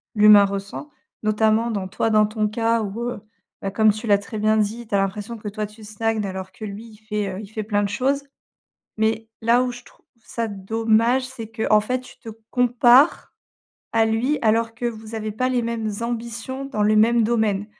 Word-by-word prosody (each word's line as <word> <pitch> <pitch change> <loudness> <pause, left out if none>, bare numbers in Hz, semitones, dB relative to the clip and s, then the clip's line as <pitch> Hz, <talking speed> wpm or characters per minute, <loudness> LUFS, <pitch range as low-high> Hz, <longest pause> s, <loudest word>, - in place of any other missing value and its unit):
l'humain 210 -1 +8
ressent, 200 +8 -5 0.3
notamment, 220 +2 +2
dans 200 -3 -3
toi, 210 +4 -1
dans 215 -1 +4
ton 215 0 -1
cas 230 +1 0
où, 210 +2 -4
heu, 245 - -8 0.4
bah, 195 - -2
comme 215 +1 +4
tu 215 +2 -7
l'as 205 -1 +5
très 210 +2 -7
bien 215 +1 +3
dit, 220 +2 -1
tu 205 - -1
as - - +4
l'impression 200 +4 -2
que, 210 - -8
toi, 210 +1 -3
tu 215 +1 -16
stagnes, 215 0 -2
alors 190 -1 -6
que, 215 - -9
lui, 205 +2 -7
il - - -16
fait, 210 -1 -3
heu, - - -6
il 210 - -9
fait 215 +1 -5
plein 205 -1 0
de 200 - -1
choses 270 +7 0 0.7
mais 220 +1 0
là 235 +2 +4
où 250 - -2
je 245 0 -10
trouve - - -22 0.2
ça 230 -1 -3
dommage, 225 +5 +1
c'est 255 -3 -8
qu'en 220 -1 +2
fait 255 +4 -2
tu 255 - -16
te 230 - -9 0.2
compares 245 +4 +4 0.6
à 225 -1 +4
lui 235 +7 0
alors 225 0 +2
que 230 +2 -8
vous 225 -1 -6
avez 215 -1 -4
pas 255 +5 0
les 250 -2 0
mêmes 230 -2 -2
ambitions 235 +3 -4
dans 215 -7 -1
le 215 +1 +3
même 230 +2 +4
domaine 215 -3 0
220 Hz, 210 wpm, -22 LUFS, 210-235 Hz, 0.7 s, l'humain